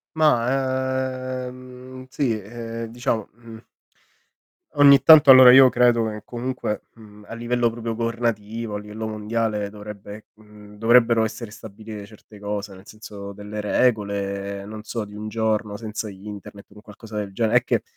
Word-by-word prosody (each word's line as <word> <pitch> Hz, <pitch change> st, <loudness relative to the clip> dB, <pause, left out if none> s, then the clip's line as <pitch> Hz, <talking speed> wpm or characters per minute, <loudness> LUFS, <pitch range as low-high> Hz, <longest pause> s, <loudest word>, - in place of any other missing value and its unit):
Ma, 130 Hz, -2 st, 0 dB
ehm, 130 Hz, 0 st, -12 dB
sì, 125 Hz, -7 st, -1 dB
ehm, 115 Hz, +2 st, -7 dB
diciamo, 115 Hz, -3 st, -2 dB
mhmm 115 Hz, 0 st, -13 dB, 1.1 s
ogni 140 Hz, -2 st, +7 dB
tanto, 150 Hz, -1 st, +8 dB
allora 130 Hz, -1 st, +10 dB
io 130 Hz, 0 st, +8 dB
credo 120 Hz, -2 st, +3 dB
che 105 Hz, -1 st, -7 dB
comunque, 125 Hz, -3 st, -4 dB
mhmm, 105 Hz, -2 st, -16 dB
a -, -, -7 dB
livello 120 Hz, +1 st, 0 dB
proprio 115 Hz, 0 st, -5 dB
governativo, 115 Hz, -1 st, -3 dB
a -, -, -3 dB
livello 105 Hz, +1 st, -7 dB
mondiale 110 Hz, -1 st, -2 dB
dovrebbe, 105 Hz, 0 st, -10 dB
mhmm, 105 Hz, -1 st, -16 dB
dovrebbero 115 Hz, 0 st, +4 dB
essere 110 Hz, 0 st, -6 dB
stabilire 110 Hz, -1 st, -10 dB
certe 105 Hz, 0 st, -17 dB
cose. 105 Hz, -1 st, -5 dB
Nel 95 Hz, +2 st, -16 dB
senso 105 Hz, -2 st, -10 dB
delle 105 Hz, +1 st, -7 dB
regole, 100 Hz, -3 st, -1 dB
non 105 Hz, +1 st, -9 dB
so 110 Hz, 0 st, -5 dB
di 105 Hz, 0 st, -13 dB
un 105 Hz, +1 st, -6 dB
giorno 110 Hz, -1 st, -1 dB
senza 110 Hz, 0 st, -6 dB
internet, 100 Hz, 0 st, -10 dB
un 105 Hz, +1 st, -15 dB
qualcosa 105 Hz, +1 st, -12 dB
del 105 Hz, -2 st, -4 dB
genere, 115 Hz, +3 st, +3 dB
è 125 Hz, -, -10 dB
che, -, -, 0 dB
110 Hz, 150 wpm, -22 LUFS, 105-120 Hz, 1.1 s, allora